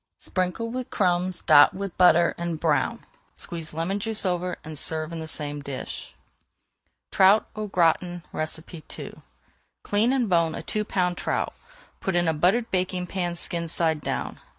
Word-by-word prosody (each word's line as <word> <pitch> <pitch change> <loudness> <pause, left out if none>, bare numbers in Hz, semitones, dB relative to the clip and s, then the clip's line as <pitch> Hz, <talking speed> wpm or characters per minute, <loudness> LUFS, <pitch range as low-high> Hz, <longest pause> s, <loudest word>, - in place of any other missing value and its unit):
Sprinkle 185 +5 -2
with 255 0 -4
crumbs, 180 -2 +1
dot 145 +4 +7
with 195 -2 -5
butter, 170 -2 +5
and 170 -2 -3
brown. 150 -5 0 0.3
Squeeze 165 -2 -6
lemon 165 +6 -2
juice 220 0 -2
over 180 0 -1
and 155 0 -8
serve 155 +2 0
in 165 - -4
the 160 - -6
same 145 -2 -3
dish. 140 -2 -7 1.0
TROUT 195 +3 +5
AU 215 0 -3
GRATIN 175 -1 +1
II 160 +1 -5 0.7
Clean 215 +4 +2
and 260 -4 +1
bone 170 -3 +2
a - - -6
two 215 - -1
pound 180 -3 0
trout. - - -1 0.5
Put 190 - -2
in 175 -1 +2
a 160 - +3
buttered 190 +10 +2
baking 185 -1 -1
pan, 175 -1 -2
skin 170 0 -1
side 160 -2 0
down. - - -3
175 Hz, 155 wpm, -25 LUFS, 160-190 Hz, 1.0 s, dot